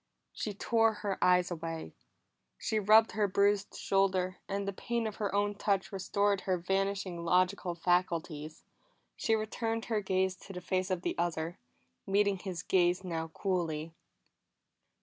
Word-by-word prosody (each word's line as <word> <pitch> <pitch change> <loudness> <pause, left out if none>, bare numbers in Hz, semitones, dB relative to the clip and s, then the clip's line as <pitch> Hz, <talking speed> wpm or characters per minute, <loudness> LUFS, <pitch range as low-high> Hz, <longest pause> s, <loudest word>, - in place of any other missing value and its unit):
She 210 -2 -4
tore 225 +1 +3
her 195 -2 -1
eyes 180 0 +4
away. 165 -1 -5 0.6
She 220 -1 -1
rubbed 215 +2 +6
her 210 -1 +1
bruised 200 +1 +2
shoulder, 190 -2 +1
and 200 0 -2
the 200 - -1
pain 235 +4 -2
of 215 -2 -4
her 205 -2 -1
own 205 0 +2
touch 200 -1 0
restored 200 +1 +1
her 185 -1 0
vanishing 195 -1 -1
logical 180 +1 +2
faculties. 165 -3 -1 0.5
She 225 - +1
returned 225 +1 -2
her 215 - +2
gaze 190 -1 +1
to 195 - -11
the 180 - -5
face 185 +1 -1
of 185 -2 -1
the - - -1
other, 170 -1 -2 0.5
meeting 200 0 +2
his 180 -3 -5
gaze 180 0 +2
now 165 -3 -3
coolly. 165 -2 -2
190 Hz, 150 wpm, -32 LUFS, 175-205 Hz, 0.6 s, rubbed